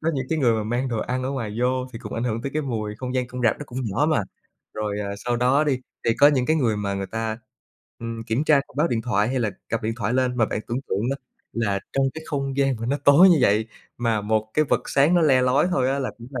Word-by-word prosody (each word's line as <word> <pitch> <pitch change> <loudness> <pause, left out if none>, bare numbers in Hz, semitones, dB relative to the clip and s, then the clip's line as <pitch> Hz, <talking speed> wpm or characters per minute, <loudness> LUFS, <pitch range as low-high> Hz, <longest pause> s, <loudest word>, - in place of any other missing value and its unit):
có 160 - +1
những 130 -1 -2
cái 160 - 0
người 125 -5 +3
mà 110 -1 0
mang 120 +4 -1
đồ 115 -3 -2
ăn 125 +2 -2
ở 130 - -2
ngoài 115 -6 -4
vô 125 +1 0
thì 115 - -7
cũng - - -7
ảnh 115 - -2
hưởng 115 -1 -2
tới 140 - -3
cái 155 - 0
mùi, 110 -5 -3
không 130 +1 -5
gian 125 -1 0
cong 125 +1 -7
rạp 115 - +2
nó 145 - -6
cũng 125 0 -6
nhỏ 115 +7 0
mà. 150 -8 +2 0.5
Rồi, 105 -1 -3
à, 100 -1 -3
sau 120 0 0
đó 130 +5 +3
đi, 140 -4 +1 0.3
thì - - +3
có 145 - +8
những 130 -4 +1
cái 155 - +2
người 120 -8 +1
mà 100 -1 -2
người 95 0 -3
ta, 110 +1 -3 0.6
ừm, 115 -1 -5
kiểm 115 +7 -1
tra 150 -3 +5
thông 145 - -19
báo 155 +4 +2
điện 115 -2 -1
thoại 110 -2 +1
hay 130 +1 -1
là 110 -3 0 0.2
cặp 115 +1 -2
điện 110 +1 -1
thoại 110 -1 -1
lên, 125 -1 +1
mà 115 -3 +3
bạn 105 - -3
tưởng 120 +3 -2
tượng 105 +5 -1
đó 135 - -1 0.4
là 105 -4 0
trong 135 0 +2
cái 160 - -7
không 135 -2 -3
gian 135 -3 +2
mà 115 - -3
nó 140 +4 +1
tối 150 +7 +8
như 175 -4 +5
vậy 110 -1 +3 0.3
mà 115 -3 +1
một 110 +1 -1
cái 155 - +3
vật 145 - -1
sáng 140 +5 +4
nó 175 - +4
le 135 -4 +4
lói 130 +5 +3
thôi 130 -7 +1
á 140 - 0
là 135 - -2
cũng 120 - -10
là 130 -4 -4
125 Hz, 295 wpm, -23 LUFS, 110-135 Hz, 0.6 s, có